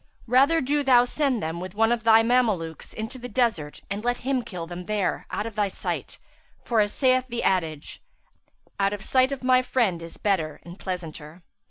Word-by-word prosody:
Rather 275 Hz, +7 st, +4 dB
do 290 Hz, +2 st, +1 dB
thou 250 Hz, -3 st, +5 dB
send 265 Hz, -, 0 dB
them 160 Hz, +2 st, -3 dB
with 185 Hz, +3 st, -7 dB
one 225 Hz, +2 st, +3 dB
of 235 Hz, -2 st, 0 dB
thy 225 Hz, 0 st, +6 dB
Mamelukes 215 Hz, -10 st, 0 dB
into 225 Hz, +4 st, -6 dB
the 245 Hz, 0 st, -7 dB
desert 215 Hz, -, -1 dB
and 200 Hz, +2 st, -4 dB
let 245 Hz, 0 st, 0 dB
him 265 Hz, -1 st, +1 dB
kill 180 Hz, -7 st, -6 dB
them 175 Hz, +1 st, -8 dB
there 210 Hz, -3 st, -1 dB
out 210 Hz, -, -3 dB
of 230 Hz, -, -5 dB
thy 205 Hz, -1 st, +1 dB
sight, 195 Hz, -, -5 dB, 0.5 s
for, 230 Hz, -2 st, +1 dB
as 205 Hz, -1 st, +2 dB
saith 255 Hz, 0 st, +2 dB
the 240 Hz, 0 st, -3 dB
adage, 160 Hz, -6 st, -1 dB, 0.8 s
'Out 195 Hz, 0 st, +2 dB
of 205 Hz, -1 st, -6 dB
sight 260 Hz, +1 st, +2 dB
of 275 Hz, -2 st, -5 dB
my 255 Hz, 0 st, +5 dB
friend 225 Hz, -9 st, 0 dB
is 165 Hz, 0 st, -10 dB
better 165 Hz, -7 st, -1 dB
and 175 Hz, +3 st, -11 dB
pleasanter.' 170 Hz, -2 st, -7 dB
215 Hz, 195 wpm, -25 LUFS, 180-250 Hz, 0.8 s, thy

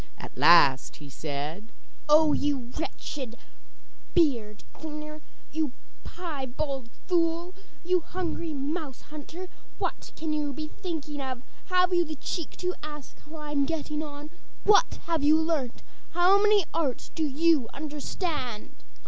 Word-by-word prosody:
At -, -, -9 dB
last 135 Hz, -1 st, +6 dB
he 145 Hz, -2 st, -11 dB
said: 155 Hz, -, -4 dB, 0.4 s
'Oh, 305 Hz, 0 st, +7 dB
you 275 Hz, -4 st, 0 dB
wretched 265 Hz, -6 st, -4 dB, 0.8 s
beard 235 Hz, -11 st, +2 dB
cleaner, 305 Hz, 0 st, -7 dB, 0.3 s
you 310 Hz, -4 st, 0 dB, 0.3 s
piebald 275 Hz, -5 st, -4 dB, 0.2 s
fool, 340 Hz, 0 st, +1 dB, 0.3 s
you 360 Hz, +1 st, +3 dB
hungry 335 Hz, -1 st, -3 dB
mouse 290 Hz, -1 st, -3 dB
hunter, 315 Hz, +5 st, -8 dB, 0.3 s
what -, -, -3 dB
can 315 Hz, -1 st, -2 dB
you 295 Hz, -2 st, 0 dB
be 305 Hz, +2 st, -5 dB
thinking 310 Hz, -6 st, -4 dB
of? 260 Hz, -2 st, -4 dB, 0.2 s
Have 365 Hz, 0 st, +4 dB
you 350 Hz, -1 st, +5 dB
the 315 Hz, -1 st, -5 dB
cheek 320 Hz, +3 st, -4 dB
to 360 Hz, 0 st, 0 dB
ask 295 Hz, -2 st, -8 dB
how 320 Hz, -, -9 dB
I 300 Hz, -1 st, -6 dB
am 280 Hz, -1 st, +3 dB
getting 300 Hz, -1 st, -2 dB
on? 295 Hz, 0 st, -7 dB, 0.3 s
What 425 Hz, +4 st, +5 dB
have 330 Hz, -3 st, +1 dB
you 305 Hz, +2 st, +6 dB
learnt? 315 Hz, -7 st, -1 dB, 0.3 s
How 365 Hz, +4 st, +6 dB
many 420 Hz, -3 st, +5 dB
arts 285 Hz, -7 st, -1 dB
do 320 Hz, -, -1 dB
you 300 Hz, -3 st, +3 dB
understand? 295 Hz, -, -3 dB
305 Hz, 135 wpm, -28 LUFS, 275-335 Hz, 0.8 s, Oh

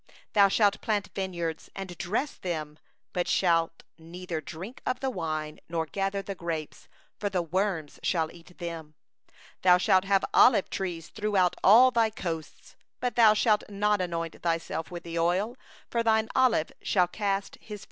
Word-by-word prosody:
39Thou 200 Hz, -2 st, +6 dB
shalt 205 Hz, -2 st, +3 dB
plant 205 Hz, -2 st, -1 dB
vineyards 170 Hz, -4 st, -4 dB
and 190 Hz, -2 st, -6 dB
dress 225 Hz, +11 st, -1 dB
them, 155 Hz, -4 st, -5 dB, 0.3 s
but 180 Hz, -1 st, -1 dB
thou -, -, 0 dB
shalt 165 Hz, -2 st, +1 dB, 0.2 s
neither 170 Hz, 0 st, -6 dB
drink 180 Hz, -, -9 dB
of 255 Hz, -, -1 dB
the 265 Hz, -1 st, -1 dB
wine, 155 Hz, -6 st, -4 dB
nor 165 Hz, -1 st, -1 dB
gather 195 Hz, +3 st, -2 dB
the 195 Hz, -, -5 dB
grapes; 165 Hz, -4 st, -5 dB, 0.3 s
for 205 Hz, -, -1 dB
the 185 Hz, -3 st, -1 dB
worm 180 Hz, -2 st, -1 dB
shall 160 Hz, -3 st, 0 dB
eat 175 Hz, +1 st, -16 dB
them. 165 Hz, -3 st, -7 dB, 0.7 s
40Thou 180 Hz, -1 st, +6 dB
shalt 185 Hz, +1 st, +3 dB
have 195 Hz, -1 st, +2 dB
olive 230 Hz, -6 st, +5 dB
trees 175 Hz, -4 st, -4 dB
throughout 205 Hz, -4 st, +1 dB
all 240 Hz, +6 st, +8 dB
thy 230 Hz, -2 st, +3 dB
borders, 165 Hz, -7 st, -6 dB, 0.2 s
but 250 Hz, -1 st, -2 dB
thou 220 Hz, -3 st, +6 dB
shalt 210 Hz, -1 st, +3 dB
not 205 Hz, 0 st, +1 dB
anoint 165 Hz, -2 st, -4 dB
thyself 165 Hz, -1 st, -2 dB
with 175 Hz, -1 st, -7 dB
the 170 Hz, 0 st, -4 dB
oil; 185 Hz, +8 st, +1 dB, 0.4 s
for 235 Hz, -, +1 dB
thine 220 Hz, -1 st, +2 dB
olives 240 Hz, -11 st, +3 dB
shall 180 Hz, -3 st, +2 dB
drop 200 Hz, +2 st, -1 dB, 0.3 s
off. 210 Hz, -1 st, -6 dB
185 Hz, 165 wpm, -28 LUFS, 165-210 Hz, 0.7 s, all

